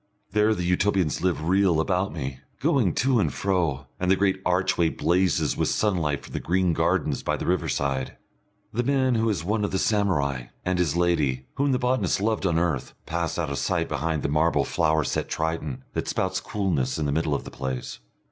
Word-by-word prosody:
There 105 +1 +3
the 90 - -3
Utopians 90 -2 +1
live 85 -4 0
real 95 -3 +3
about 90 +3 0
me, 65 -4 -5 0.2
going - - +2
to 130 -1 +2
and - - +1
fro, 85 -9 0
and 90 - 0
the 95 - +6
great 95 -1 +1
archway 90 -2 +2
blazes 90 +2 +1
with - - 0
sunlight 85 -9 0
from - - -12
the - - -2
green 90 -1 +1
gardens 80 -4 +1
by - - -1
the - - -5
riverside. 70 -7 -1 0.6
The 120 - +1
man 130 0 +2
who 115 -1 +2
is 95 -7 -1
one 105 +4 0
of 100 - 0
the 95 - -1
samurai, 75 - +1 0.2
and 90 -1 0
his 85 -4 +1
lady, 75 -7 +1
whom 140 0 +1
the 130 - +2
botanist 125 -3 +1
loved 105 -1 0
on 85 -2 +1
earth, 80 -6 -1
pass 85 0 -2
out 80 -4 -2
of 70 - -2
sight - - 0
behind 80 -2 -2
the - - +1
marble 75 -1 +2
flower 80 0 +1
set - - -2
Triton 80 -4 -3
that - - -2
spouts 95 0 -1
coolness 80 - -1
in 75 - -1
the 70 - 0
middle 75 0 0
of - - -3
the - - -9
place. 65 -1 -5
85 Hz, 200 wpm, -25 LUFS, 75-95 Hz, 0.6 s, the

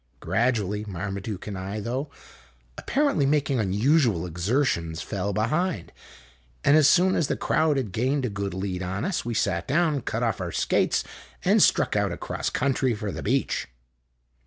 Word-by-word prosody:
Gradually, 105 - 0
Marmaduke 100 +1 -5
and 105 - -5
I, 95 +3 -4
though 130 +7 -3 0.7
apparently 275 - +1
making 140 -3 +1
un 100 -4 0
usual 115 - +2
exertions, 85 - -1
fell 100 -1 -3
behind, 130 - -1 0.7
and 145 - +5
as 155 -2 +6
soon 185 +3 +5
as 155 - +1
the - - -1
crowd 155 -3 +1
had 120 -7 -2
gained 130 +6 0
a - - -1
good 100 -2 -4
lead 95 -1 -3
on 95 +2 -3
us, 190 -2 -1
we 120 -1 -3
sat 85 -5 0
down, 155 -1 +2
cut 115 0 -2
off 110 -4 -1
our 85 -2 -3
skates, - - +1 0.4
and - - +4
struck - - +3
out - - +1
across - - -3
country 130 -2 0
for 105 -1 -4
the - - -6
beach. 130 +5 0
110 Hz, 165 wpm, -25 LUFS, 95-140 Hz, 0.7 s, as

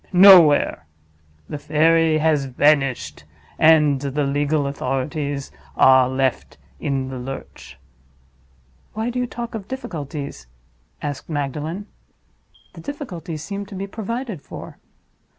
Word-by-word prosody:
Nowhere. 180 - +7 0.6
The 150 - -6
fairy 160 +2 +3
has 155 -3 +2
vanished; 135 0 +1 0.4
and 150 -4 +5
the 145 +1 -1
legal 145 +1 0
authorities 140 +1 -3 0.2
are 130 -1 +6
left 130 -1 -1 0.2
in 135 -2 -2
the 130 -1 -6
lurch." 135 +2 -9 1.2
"Why 220 +3 -2
do 250 - -3
you 250 - -1
talk 235 0 -6
of 210 -3 -6
difficulties?" 145 - -6 0.6
asked 145 +1 -5
Magdalen. 155 +6 -3 0.9
"The - - -11
difficulties 175 - -6
seem 200 +3 -5
to 200 - -10
be 195 +1 -4
provided 220 - -5
for." - - -10
150 Hz, 115 wpm, -21 LUFS, 140-190 Hz, 1.2 s, Nowhere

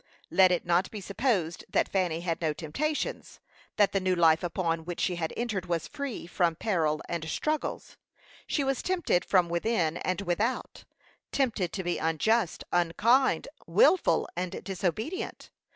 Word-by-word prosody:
Let 185 -1 +6
it 180 - 0
not 175 +2 +2
be 215 - -7
supposed 195 -5 -1
that - - +2
Fanny 175 -4 0
had 170 -1 -2
no 155 -2 +1
temptations; 300 - -3 0.4
that 205 -2 +4
the 195 - +1
new 185 -1 +1
life 165 -2 +5
upon 165 -2 -1
which 175 +1 -6
she 180 -2 0
had 160 -1 -2
entered 215 -6 -2
was 170 -2 -1
free 280 - -5
from 175 -1 +1
peril 160 -6 0
and 165 -2 -3
struggles. 305 - -2 0.5
She 290 - 0
was 270 -1 0
tempted 345 - +1
from 180 -2 +3
within 170 -2 0
and 185 +2 -2
without; 200 +7 -2 0.5
tempted 230 -10 0
to 190 - -3
be 175 0 -1
unjust, 175 +5 +1
unkind, 215 +10 +3 0.2
wilful, 375 - +4
and 180 0 -4
disobedient. 200 - -3
180 Hz, 150 wpm, -28 LUFS, 170-225 Hz, 0.5 s, Let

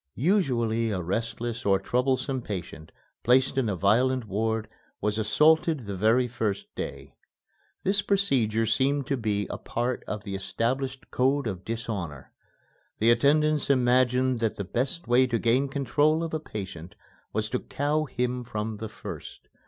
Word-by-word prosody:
Usually 120 - +1
a 100 -4 -1
restless 115 +5 -3
or 100 -1 +4
troublesome 130 +5 0
patient 85 -7 -6 0.3
placed 130 +3 +3
in 135 -3 +1
the 100 - 0
violent 120 +7 +2
ward 110 +2 -1 0.3
was 105 +1 -1
assaulted 155 +7 +3
the 100 -3 -5
very 115 +6 +3
first 110 -5 -2
day. - - -6 0.7
This 200 +2 +2
procedure 125 - +1
seemed 135 +5 +1
to 140 - 0
be 105 -4 -1
a - - -5
part 120 +1 -2
of 105 -1 -4
the 100 -2 -6
established 130 +7 -2
code 135 +2 +2
of 95 -4 -4
dishonor. 100 - -5 0.7
The 115 +2 +4
attendants 150 +5 +3
imagined 125 -1 +3
that 115 -2 0
the 100 - -4
best 130 - -2
way 125 +2 +4
to 120 -2 0
gain 120 +5 +2
control 145 +4 +2
of 165 - -4
a 155 - 0
patient 95 - -7 0.4
was 110 0 -1
to 125 - 0
cow 150 +2 -1
him 125 -2 -2
from 110 -1 -4
the 110 +1 -5
first. 105 - -9
120 Hz, 150 wpm, -27 LUFS, 110-135 Hz, 0.7 s, or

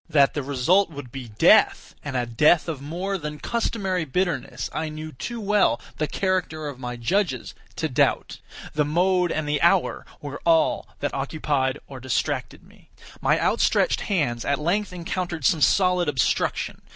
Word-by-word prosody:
That 140 -4 +4
the 145 - -2
result 145 +8 +2
would 145 -6 -9
be 130 -2 -7
death, 105 -1 +4
and 140 -3 -3
a 120 - 0
death 150 +9 +3
of 155 -5 -4
more 180 +7 -3
than 150 -1 -5
customary 195 -3 -1
bitterness, 155 -3 -2
I 160 0 -2
knew 155 +1 -7
too 235 - -6
well 205 - +2 0.2
the 155 - 0
character 180 -5 -1
of 140 -3 -7
my 125 -1 -5
judges 130 - -1 0.2
to 160 - -1
doubt. 140 0 0 0.3
The 150 - +2
mode 180 +4 +2
and 155 -1 -2
the 150 0 0
hour - - +2
were 145 -1 -7
all 165 -1 +2
that 145 - -1
occupied 140 -1 -1
or 135 - -10
distracted 130 -3 -2
me. - - -21 0.3
My - - +3
outstretched - - +2
hands 130 - -1
at 140 - +1
length 185 +7 0
encountered 175 -3 -4
some 160 - +3
solid 180 0 +3
obstruction. 130 -4 0
155 Hz, 165 wpm, -24 LUFS, 135-180 Hz, 0.3 s, That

